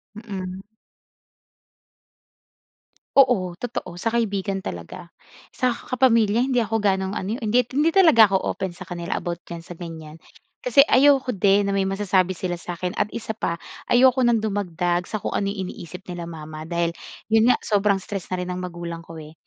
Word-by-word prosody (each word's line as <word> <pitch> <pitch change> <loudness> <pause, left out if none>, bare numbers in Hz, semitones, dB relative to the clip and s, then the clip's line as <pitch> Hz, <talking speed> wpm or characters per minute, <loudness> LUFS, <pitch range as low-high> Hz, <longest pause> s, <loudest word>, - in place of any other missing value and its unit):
Mm. 190 -4 -6 2.6
Oo, 190 -10 +4
totoo, 220 -7 -5
sa 225 - -2
kaibigan 200 -4 -1
talaga. 85 - -8 0.4
Sa 250 -2 0
kapamilya, 235 -2 +2
hindi 250 -3 +2
ako 225 +1 -1
gano'ng 190 -2 +1
ano 195 -1 -4
eh, 250 - -8
hin 210 - -1 0.2
hindi 300 +3 +4
talaga 315 - +6
ako 190 - +3 0.2
open 190 -2 -3
sa 180 +1 -11
kanila 175 -2 -3
about 175 0 -5
diyan 170 -1 -8
sa 175 +1 -10
ganiyan. 160 -3 -9 0.5
Kasi 300 - +5
ayoko 270 -2 +4
din 200 +1 +3
na 200 - 0
may 195 -1 +1
masasabi 190 -2 +1
sila 180 -1 -2
sa 175 0 -6
akin 180 +1 -3
at 210 0 -1
isa 220 -1 -5
pa 170 -6 -2 0.3
ayoko 255 +1 +5
ng 240 -2 +4
dumagdag 180 -3 -1
sa 215 - -2
kung - - -4
ano 200 -1 0
yung 195 -2 -3
iniisip 180 +1 -9
nila 175 -2 -6
mama 155 0 -8
dahil, 170 -1 0 0.4
yun 225 +2 +5
nga, - - +5
sobrang 205 -1 +2
stress 195 -1 -6
na 185 - -2
rin 180 - -3
ang 180 - -5
magulang 170 -2 -6
ko, 165 0 -11
eh. 155 0 -10
195 Hz, 175 wpm, -23 LUFS, 175-225 Hz, 2.6 s, talaga